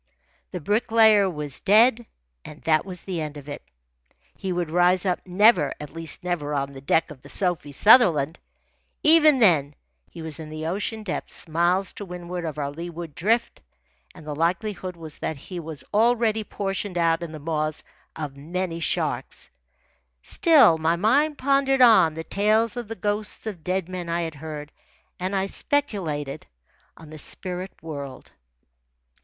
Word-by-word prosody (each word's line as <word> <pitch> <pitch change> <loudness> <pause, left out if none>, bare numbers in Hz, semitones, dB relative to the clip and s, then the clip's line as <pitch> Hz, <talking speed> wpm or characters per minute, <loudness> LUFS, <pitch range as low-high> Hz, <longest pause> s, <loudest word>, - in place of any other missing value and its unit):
The 180 - -5
Bricklayer 215 +2 +4
was 150 -5 -4
dead, 225 +3 +4 0.4
and 150 - -11
that 155 +2 +2
was 180 -2 -6
the 180 -4 -3
end 150 -1 -5
of 145 -1 -11
it. 145 - -6 0.7
He 190 - -4
would 175 -3 -2
rise 180 +2 +3
up 180 -2 +1
never 185 -5 +4
at 150 -1 -9
least, 165 -1 -5
never 155 -5 -2
on 140 0 -2
the 135 - -10
deck 160 +4 +1
of 135 -4 -12
the 140 - -14
Sophie 175 -6 -2
Sutherland. 165 - +5 0.6
Even 310 -2 +6
then 155 - +3 0.3
he 165 - -9
was 160 0 -1
in 155 -1 -8
the 155 0 -6
ocean 210 +5 -3
depths 185 -2 -6
miles 175 +4 +1
to - - -7
windward 180 -1 -6
of 155 -2 -5
our 140 -1 -2
leeward 170 0 -7
drift, 225 +9 0 0.5
and 155 - -13
the 150 - -4
likelihood 180 +3 -2
was 160 -3 -9
that 160 - -3
he 175 +6 -8
was 160 -3 -7
already 225 0 +2
portioned 195 -2 -4
out 165 -1 +2
in 170 -2 -6
the 155 - -7
maws 155 0 -2 0.3
of 150 -3 -5
many 170 +4 -4
sharks. 165 - -2 0.7
Still, 300 - +5
my 160 +2 +2
mind 280 - +2
pondered 270 -1 +3
on 185 -10 +6
the 160 - -5
tales 215 +5 +1
of 240 -3 -5
the 225 - -6
ghosts 210 +3 -3
of 195 -7 -6
dead 185 -1 -1
men 180 -2 -6
I 170 +1 0
had 165 -2 -4
heard, 150 0 -8 0.5
and 185 +2 -2
I 190 0 +1
speculated 190 - -2 0.5
on 160 -2 -13
the 155 - -8
spirit 180 +5 -4
world. 140 -4 -8
175 Hz, 165 wpm, -24 LUFS, 155-210 Hz, 0.7 s, Even